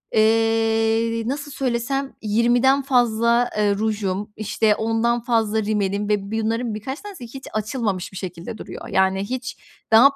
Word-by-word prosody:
eee, 225 +1 +2
nasıl 285 +3 -3
söylesem 270 +1 -2
20'den 240 +5 +3
fazla, 240 -2 +2
eee, 205 -1 +2
rujum, 210 -1 -2
işte, 215 0 +1
10'dan 225 +2 +1
fazla 220 -2 +1
rimelim 205 -1 -1
ve 205 -1 0
bunların 225 +1 -1
birkaç 265 +8 -5
tanesi 405 -9 -9
hiç 265 +3 -9
açılmamış 215 -4 -2
bir 190 - -9
şekilde 180 +2 -6
duruyor. - - -8
Yani, 190 0 +2
hiç 250 +5 -4 0.3
daha 260 +6 +7
225 Hz, 135 wpm, -22 LUFS, 210-240 Hz, 0.3 s, daha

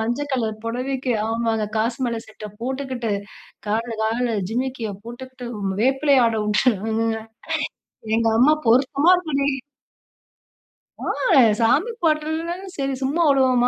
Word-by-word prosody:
மஞ்ச 240 +6 -1
கலர் 225 -4 -1
புடவைக்கு 255 +1 -2
ஆமாங்க. 225 -1 0
காசு 230 +2 0
மால 230 -1 -2
செட்ட 215 -1 -9
போட்டுக்கிட்டு, 260 -2 -3 0.6
காலுனு 225 +2 -1
காலுனு 230 +1 0 0.2
ஜிம்மிக்கிய 250 -2 -2
போட்டுக்கிட்டு, 250 +1 -8
ம் 195 -1 -1
வேப்பிலை 270 +3 +3
ஆட 230 - 0
உட்டாங்கங்க. 225 +1 +1 1.0
எங்க 230 0 +2
அம்மா 300 +5 +6
பொருத்தமா 275 +6 +4
இருக்குடி! 285 -5 0 1.5
ஆ! - - -8 0.6
சாமி 280 - +3
பாட்டனாலும் 325 +4 -1
சரி 275 -1 -1
சும்மா 280 +6 0
விடுவோமா, 260 -3 +4
250 Hz, 115 wpm, -22 LUFS, 225-275 Hz, 1.5 s, அம்மா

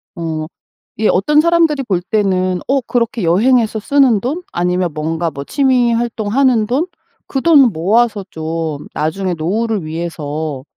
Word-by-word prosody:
어 160 -3 -3 0.5
예. 220 - +2
어떤 295 +11 +3
사람들이 330 -4 +2
볼 190 -8 -1
때는 185 -2 0
'어 275 +1 +2
그렇게 235 -2 -1
여행해서 220 +6 +2
쓰는 255 -3 +3
돈? 300 +9 -3
아니면 180 0 0
뭔가 160 +2 -2
뭐 140 -1 -7
취미 250 - +2
활동하는 230 +1 +1
돈? 275 +9 0 0.4
그 270 - -2
돈 280 - +5
모아서 210 +6 +1
좀 160 -3 -4
나중에 180 +4 -2
노후를 205 +5 -1
위해서 155 -3 -4
205 Hz, 280 characters per minute, -16 LUFS, 165-250 Hz, 0.5 s, 돈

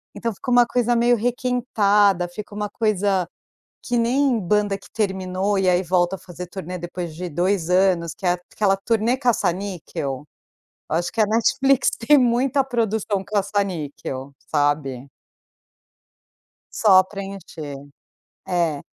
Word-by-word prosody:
Então 230 -1 -2
fica 225 - -7
uma 245 0 +6
coisa 240 0 +1
meio 240 +1 +4
requentada, 215 -6 +2
fica 205 +4 -9
uma 210 0 -3
coisa, 200 -5 0 0.6
que 245 - -2
nem 250 +2 +2
banda 205 +1 +1
que - - -17
terminou 190 -1 -1
e 190 -1 +2
aí 180 0 +3
volta 180 +1 +1
a - - -18
fazer 180 0 -9
turnê 180 0 -6
depois 175 -1 -6
de 180 +2 -5
2 175 +2 0
anos 180 -3 +2
que - - -16
é 175 - +4
aquela 195 +3 0
turnê 225 +4 +1
caça-níquel. 180 - -2 0.7
Eu 155 - 0
acho 175 - -2
que 225 - 0
a - - +5
Netflix 265 +5 +3
tem 285 +6 +5
muita 255 +2 +2
produção 220 -5 -1
caça-níquel, 185 -10 -3 0.2
sabe. 145 -3 0 1.7
Só 190 -4 +6
preencher. 195 -7 -8 0.7
É. 170 -5 0
195 Hz, 135 wpm, -22 LUFS, 175-230 Hz, 1.7 s, uma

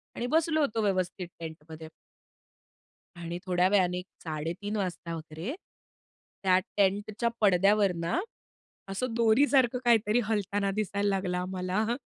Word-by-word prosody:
आणि 240 - -2
बसलो 315 +2 +2
होतो 225 -6 0
व्यवस्थित 185 -2 -1
टेंटमध्ये. 160 -1 -9 1.3
आणि 170 0 -5
थोड्या 180 0 +3
वेळाने 180 -3 +2 0.2
3:30 165 +7 -4
वाजता 180 -4 -3
वगैरे, 160 - -6 0.9
त्या 185 -1 +4 0.2
टेंटच्या 205 +3 +1
पडद्यावर 200 0 +4
ना, 170 - -1 0.7
असं 225 +5 -2
दोरीसारखं 240 +2 +4
काहीतरी 230 0 +4
हलताना 205 -2 0
दिसायला 205 -1 -1
लागला 190 -2 0
आम्हाला. 185 +5 -1
195 Hz, 110 wpm, -29 LUFS, 180-220 Hz, 1.3 s, त्या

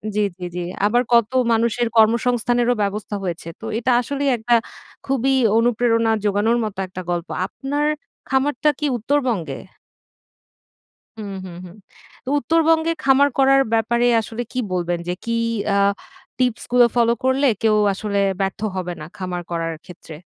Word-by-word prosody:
জি, 210 - +2 0.2
জি, 180 - -5
জি। 180 - -2 0.2
আবার 240 +4 +3
কত 235 0 +4 0.2
মানুষের 235 +1 +1
কর্মসংস্থানেরও 240 +2 +3
ব্যবস্থা 205 +1 -3
হয়েছে। 170 -2 -4
তো - - -9
এটা 245 +2 0
আসলেই 280 +2 -2
একটা 240 +2 0 0.5
খুবই 270 0 +1 0.2
অনুপ্রেরণা 230 -1 +2
জোগানোর 210 +4 +2
মতো 210 -3 -5
একটা 185 0 -7
গল্প। 170 0 -2 0.2
আপনার 290 +2 -3 0.4
খামারটা 280 +2 +1
কি 300 - -1
উত্তরবঙ্গে? 230 - -1 1.6
হুম, 200 -2 -6
হুম, 175 -2 -9
হুম, 175 +1 -12 0.5
তো 260 - -4
উত্তরবঙ্গে 325 +1 +2
খামার 275 +1 +4
করার 270 0 +5
ব্যাপারে 235 +2 +2 0.2
আসলে 225 +2 -6
কী 255 - -3
বলবেন? 175 -1 -1
যে 180 - 0
কি 230 - -4 0.4
আ - - +2 0.6
টিপস 250 -2 0
গুলো 245 -1 +6
ফলো 235 -1 +4
করলে 260 +2 +2 0.2
কেউ 220 -1 +3 0.2
আসলে 200 0 -3 0.2
ব্যর্থ 195 0 -2 0.2
হবে 180 -1 -3
না 150 - -6
খামার 180 -2 -4
করার 165 -1 -2
ক্ষেত্রে? 170 -3 -12
230 Hz, 145 wpm, -21 LUFS, 195-260 Hz, 1.6 s, গুলো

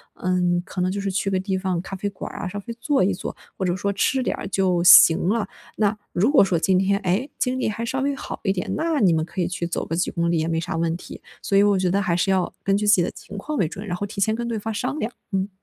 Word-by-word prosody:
嗯， 180 -1 +1
可 190 - -7
能 185 - +1
就 200 +1 -3
是 195 -1 -2
去 195 +1 -1
个 190 - +1
地 190 0 -2
方 185 -2 -1
咖 195 - -10
啡 205 +2 -2
馆 195 - -8
儿 - - -8
啊， - - -3
稍 205 +2 -5
微 235 - -5
坐 280 -2 +2
一 195 +2 +2
坐， 185 - -6 0.2
或 190 - -1
者 175 -1 0
说 200 +1 -1
吃 255 +6 +1
点 - - 0
儿 200 - -5
就 185 -3 +1
行 170 -1 +8
了。 220 0 0 0.3
那 210 0 +1 0.2
如 215 +10 +2
果 305 - +6
说 185 -3 +1
今 185 +1 +3
天， 200 +1 +2
哎， 195 +7 0
精 255 0 0
力 - - 0
还 230 +2 -4
稍 265 +3 -2
微 280 +1 0
好 - - -7
一 195 - +2
点， 180 - -3
那 320 -2 0
你 185 -5 +5
们 160 -1 0
可 180 - -4
以 175 - 0
去 175 -1 -3
走 170 - -3
个 165 - -3
几 175 - 0
公 170 0 0
里 170 - +1
也 160 +1 0
没 165 -1 -1
啥 165 - -3
问 165 0 0
题。 - - -11 0.2
所 195 - +1
以 200 - +6
我 205 -1 +3
觉 185 -1 +1
得 200 +2 +2
还 175 -3 0
是 190 +3 +1
要 185 -2 0
根 195 0 +2
据 210 0 -1
自 205 - +7
己 180 - +4
的 - - -2
情 205 - -11
况 300 +8 -4
为 175 - +2
准， 195 +7 -8
然 175 -3 -3
后 205 - -3
提 200 0 -6
前 220 +2 +2
跟 235 0 -3
对 230 -2 -2
方 225 +1 -4
商 255 +7 -2
量， 225 - -2 0.2
嗯。 190 +1 0
195 Hz, 330 characters per minute, -23 LUFS, 180-210 Hz, 0.3 s, 行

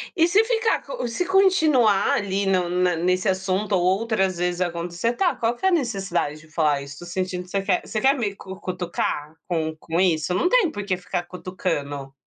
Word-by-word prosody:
E 335 -1 +4
se 405 +5 +4
ficar 455 -1 +1
co - - -4
se 235 +10 -2
continuar 315 - +4
ali 200 0 0
no 185 -2 +1
na 180 0 +1
nesse 180 +4 0
assunto 190 +2 0
ou 180 - +2 0.2
outras 195 -6 0
vezes 180 +1 -1
acontecer. 175 +5 -1
"Tá, 350 +2 +1
qual 235 -1 0
que 380 - -5
é - - +6
a - - 0
necessidade 195 - -1
de 155 - -17
falar 150 -4 +1
isso? 145 +1 -10
Tô 175 - -9
sentindo 185 0 -3
que 180 - -18
você 195 +1 -1
quer 190 -2 +1
você 215 - -2
quer 270 +5 +4
me 210 -6 -2
cu 190 -1 -10
cutucar 175 -4 -3
com 160 -3 -1
com 165 +2 -2
isso, 170 -2 +2
não 355 - +2
tem 445 -3 +4
porque 200 -5 -2
ficar 180 -1 -4
cutucando". 165 -7 -4
185 Hz, 205 wpm, -23 LUFS, 175-235 Hz, 0.2 s, é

